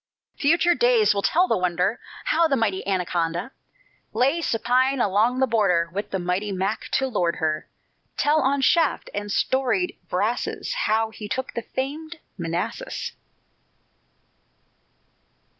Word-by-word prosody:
Future 335 +4 +3
days 235 -7 +4
will 200 - -1
tell 355 - +3
the - - +2
wonder, 180 +4 0 0.3
How 335 -10 +3
the 280 - +2
mighty 215 -6 0
Anaconda 175 +2 -1 0.6
Lay 275 +7 +2
supine 255 +1 +1
along 220 +4 +2
the 265 - +3
border, 190 -8 +2
With 205 +2 -3
the 195 - -1
mighty 180 +3 -1
Mac 195 +2 -2
to 265 - +2
lord 180 -9 0
her: 155 -1 -2 0.5
Tell 300 +2 +3
on 275 +1 +1
shaft 320 +2 +2
and 205 0 -4
storied 270 - +1
brasses - - -1
How 225 - +1
he 210 -1 -8
took 260 +5 -3
the 235 - -3
famed 300 +8 -5 0.2
Manassas. 175 - -3
225 Hz, 130 wpm, -24 LUFS, 190-275 Hz, 0.6 s, days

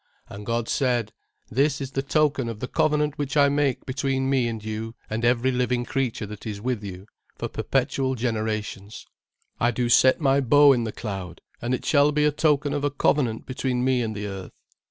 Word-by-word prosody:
"And 100 0 -9
God 115 -1 -1
said; 120 -5 0 0.4
This 140 +4 +2
is 135 -2 -5
the 135 - -1
token 140 -3 +1
of 110 -2 -6
the 125 - -4
covenant 150 0 +1
which 145 +1 -2
I 140 -1 +6
make 140 -2 0
between 135 0 -1
me 130 -3 +2
and 110 -2 -5
you 110 +1 -5 0.2
and 110 +1 -2
every 120 +2 +3
living 125 -1 0
creature 130 -4 -2
that 105 0 -9
is 105 -2 -4
with 120 -1 -2
you, 95 -1 -8 0.3
for - - -3
perpetual 130 -1 -1
generations; 110 -3 -3 0.5
"I 120 - +3
do 120 0 -1
set 130 +2 +5
my 140 -2 +3
bow 145 +2 +6
in 120 -3 0
the 110 - -3
cloud, 95 -7 -6 0.2
and 120 +2 0
it - - -8
shall 145 0 +4
be 150 0 +2
a 150 - +4
token 145 -1 +1
of 145 -1 -2
a 145 - +2
covenant 135 -4 0
between 130 -1 -2
me 130 -1 +2
and 110 -2 -3
the 105 0 -4
earth. 95 -2 -7
125 Hz, 200 wpm, -25 LUFS, 110-140 Hz, 0.5 s, I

